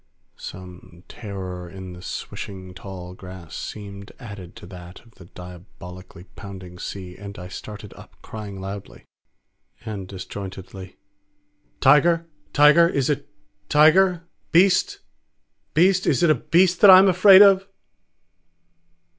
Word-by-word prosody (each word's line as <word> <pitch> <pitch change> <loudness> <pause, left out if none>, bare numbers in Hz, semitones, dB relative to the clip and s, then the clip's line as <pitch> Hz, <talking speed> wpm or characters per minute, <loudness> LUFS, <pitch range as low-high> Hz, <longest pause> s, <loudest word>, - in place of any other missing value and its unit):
Some 90 -1 -12
terror 95 -5 -8
in 95 0 -10
the 90 - -12
swishing 95 0 -8
tall 90 -1 -10
grass 90 -3 -12
seemed 100 -1 -9
added 100 -8 -11
to - - -12
that 90 0 -12
of 115 - -23
the 90 - -16
diabolically 90 0 -13
pounding 95 -3 -11
sea, 90 -2 -8
and 100 +1 -10
I 90 - -9
started 105 +1 -10
up - - -17
crying 105 -3 -9
aloud 95 +1 -9 0.8
and 100 -4 -6
disjointedly, 95 0 -9 0.8
"Tiger? 165 +5 +4 0.3
Tiger? 150 +3 +5
Is 140 -3 0
it 145 0 -4 0.4
Tiger? 165 +4 +4 0.3
Beast? 200 - +3 0.7
Beast? 185 +3 +3
Is - - +1
it 170 - +5
a - - +3
Beast 175 +1 +3
that 205 - +8
I 185 - +11
am 190 +1 +6
afraid 190 +2 +7
of?" 195 -1 +4
100 Hz, 125 wpm, -22 LUFS, -, 0.8 s, I